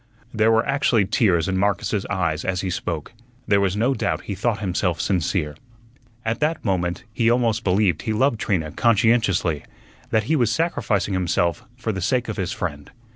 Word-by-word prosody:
There 110 0 +3
were 115 +1 +3
actually 140 -7 +2
tears 90 -6 +2
in 95 -1 0
Marcus's 100 +1 0
eyes 85 -6 -1
as 90 -1 -1
he 95 - -2
spoke. 85 0 -4 0.3
There 100 -1 +3
was 100 0 0
no 120 +5 +2
doubt 105 -6 -1
he 100 - -4
thought 105 +3 0
himself 90 -3 -1
sincere. 85 -5 0 0.7
At 115 +1 -1
that 155 -1 -1
moment 90 -3 -1
he 115 -1 +2
almost 120 -2 +1
believed 95 -3 +2
he 110 - -2
loved 115 +1 +1
Trina 80 -8 -1
conscientiously, 110 -8 +2 0.5
that 110 - +2
he 155 +9 +1
was 120 -6 +2
sacrificing 115 - 0
himself 85 -2 0
for 115 -3 -2
the 95 -2 -4
sake 120 +5 0
of 110 - -4
his 95 -1 -2
friend. 75 -5 -5
100 Hz, 180 wpm, -22 LUFS, 90-115 Hz, 0.7 s, There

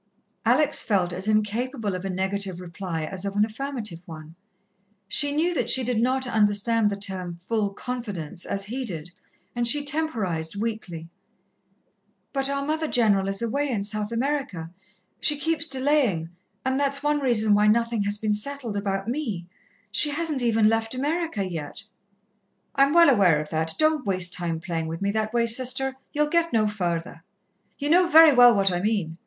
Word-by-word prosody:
Alex 300 -1 +3
felt 185 -5 0
as 185 +3 -4
incapable 215 +1 -1
of 185 0 -5
a 195 - -4
negative 190 0 -3
reply 170 -2 -6
as 185 +4 -6
of 200 0 -4
an 205 +1 +3
affirmative 220 -6 -6
one. 155 -1 -10 0.7
She 285 +7 +2
knew 325 +5 0
that 245 -7 -1
she 260 +2 +5
did 240 -2 -1
not 260 +2 +1
understand 215 -1 +2
the 200 - -3
term 185 -3 -5
"full 210 +3 -1
confidence" 200 -8 -6
as 195 0 -4
he 250 +5 -4
did, 175 -6 -7 0.4
and 240 0 +1
she 290 +4 +5
temporized 220 - 0
weakly. 205 -7 -5 1.3
"But 270 -1 -1
our 280 0 -2
Mother 315 +1 -2
General 205 -7 +2
is 195 +3 -1
away 280 +5 -1
in 215 -6 -2
South 210 +1 -4
America 235 - -3 0.5
she 295 - +3
keeps 325 +1 -1
delaying, 260 - 0 0.3
and 260 +1 0
that's 280 0 0
one 295 0 +1
reason 225 -6 +3
why 210 +1 +3
nothing 230 0 +1
has 205 +1 0
been 215 0 -1
settled 240 0 -3
about 195 0 -3
me. 230 - -3 0.5
She 300 - +4
hasn't 300 -2 -2
even 225 -2 +2
left 225 +2 0
America 295 - -2
yet." 160 -5 -6 0.9
"I'm 275 +1 +3
well 335 -2 +6
aware 185 - +3
of 150 0 -6
that. 160 0 -1
Don't 310 -2 +1
waste 185 -2 +6
time 170 -2 -2
playing 165 -1 -4
with 165 +1 -5
me 200 0 -1
that 215 0 -2
way, 235 0 +1
Sister, 260 +3 +2 0.2
ye'll 300 0 +1
get 335 +2 0
no 220 -2 +2
further. 175 -4 -4 0.5
Ye 290 - -3
know 350 +3 +4
very 320 -2 +7
well 245 -2 +7
what 195 -1 +2
I 175 0 -2
mean. 195 -6 -2
220 Hz, 175 wpm, -24 LUFS, 190-275 Hz, 1.3 s, very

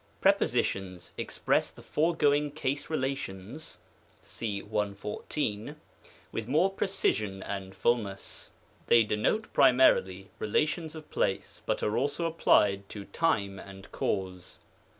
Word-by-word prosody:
Prepositions 95 -2 +1
express - - 0
the - - -14
foregoing 150 -2 +2
case 140 -1 -2
relations 135 - -4 0.4
(§114), 105 +4 -3 0.6
with 115 -1 -4
more 160 +9 +3
precision 105 - 0
and 95 -1 -5
fulness. 105 -5 -1 0.4
They 115 - +7
de 105 - -1
note 215 - 0
primarily 125 -8 +4
relations 155 +8 0
of 155 -1 -10
place, - - -1
but - - 0
are 105 - +1
also 145 +5 0
applied 100 -11 +3
to 100 -2 -7
time 100 - 0
and 95 0 -11
cav^e. 95 -3 -3
110 Hz, 110 wpm, -29 LUFS, 100-150 Hz, 0.6 s, They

